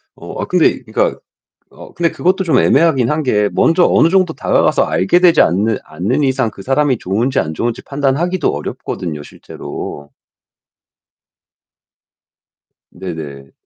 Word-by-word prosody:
어 - - -8
아 - - -2
근데 - - +2
그러니까 - - -1 0.5
어 - - -14
근데 170 -1 0
그것도 190 +2 0
좀 160 -8 +2
애매하긴 135 -5 +3
한 150 +1 -1
게 105 -6 +1
먼저 165 +2 +3
어느 165 - +4
정도 185 -2 +2
다가가서 - - +1
알게 95 - +2
되지 180 -2 +5
않는 100 +5 +1
않는 100 - -2
이상 130 -4 0
그 100 - -12
사람이 135 +3 +1
좋은지 115 +8 -1
안 80 0 -2
좋은지 115 +6 -3
판단하기도 145 +6 -1
어렵거든요 75 +1 -5
실제로. 70 0 -9 2.8
네네. 75 -7 -8
130 Hz, 295 characters per minute, -16 LUFS, -, 2.8 s, 되지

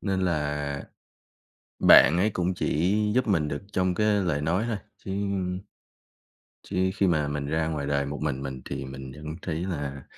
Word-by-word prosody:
Nên 95 -2 -1
là 75 -5 -1 1.0
bạn 80 +5 +8
ấy 100 +5 +3
cũng 90 -2 -1
chỉ 90 +3 +1 0.2
giúp 130 -1 +2
mình 80 -8 +2
được 70 0 -3
trong 95 -1 +1
cái 105 +2 +2 0.2
lời 80 -5 0
nói 85 +7 +1
thôi, 115 -3 -1 0.2
chứ 95 - -8 1.5
chứ 95 -1 0
khi 100 - +2
mà 80 -4 +2
mình 75 0 -3
ra 80 +1 0
ngoài 75 -3 -2
đời 70 -1 +1
một 70 +1 -5
mình 70 -3 -2
mình 65 -1 -5
thì 70 0 -4
mình 65 0 -8
vẫn 75 +3 -7
thấy 80 - -3
là 70 -7 -4
75 Hz, 175 wpm, -27 LUFS, 70-90 Hz, 1.5 s, bạn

